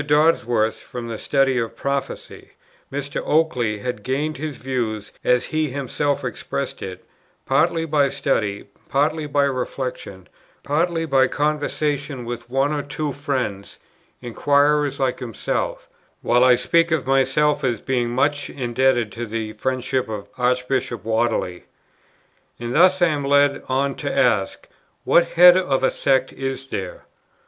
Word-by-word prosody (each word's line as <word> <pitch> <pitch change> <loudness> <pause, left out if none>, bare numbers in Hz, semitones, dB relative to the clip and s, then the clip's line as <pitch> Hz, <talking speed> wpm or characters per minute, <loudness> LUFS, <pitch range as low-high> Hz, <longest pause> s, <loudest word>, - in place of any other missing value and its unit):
Dodsworth 140 -7 +2
from 120 -1 -7
the 115 - -5
study 135 -2 +2
of 115 0 -3
Prophecy; 140 +2 -4 0.4
Mr. 140 +1 -3
Oakeley 125 -10 +1
had 125 -3 -4
gained 145 +7 -2
his 150 -2 -5
views, 115 -5 -3
as 125 0 +2
he 155 -1 -1
himself 140 +1 -2
expressed 125 - -4
it, 95 -1 -7 0.4
"partly 165 -1 +2
by 145 -3 +2
study, 115 -8 -1 0.2
partly 150 +2 +1
by 145 0 +2
reflection, 125 -7 -4 0.4
partly 165 +3 0
by 135 -3 +3
conversation 145 -2 -2
with 120 0 -6
one 135 +3 +1
or 145 - -1
two 145 0 -4
friends, 125 -9 -3 0.5
inquirers 145 +3 +2
like 130 -2 0
himself:" - - -3 0.4
while 120 +1 +4
I 125 -1 +6
speak 170 +6 +2
of 160 -5 0
myself 135 +3 +2
as 120 -4 0
being 125 -1 -1
"much 145 +4 0
indebted 120 -3 +1
to 120 +3 -5
the 110 0 -4
friendship 130 0 -2
of 105 -2 -5
Archbishop 125 -2 -1
Whately." 110 -6 -1 0.9
And 120 0 -4
thus 185 +3 +5
I 175 - +5
am 145 -2 -2
led 140 0 +3
on 135 +1 +1
to 145 - -3
ask, 105 -6 +1 0.4
"What 170 0 +4
head 180 +1 +9
of 140 -8 +1
a - - +3
sect 130 -1 +1
is 135 0 -4
there? 95 -8 -6
135 Hz, 140 wpm, -22 LUFS, 120-145 Hz, 0.9 s, head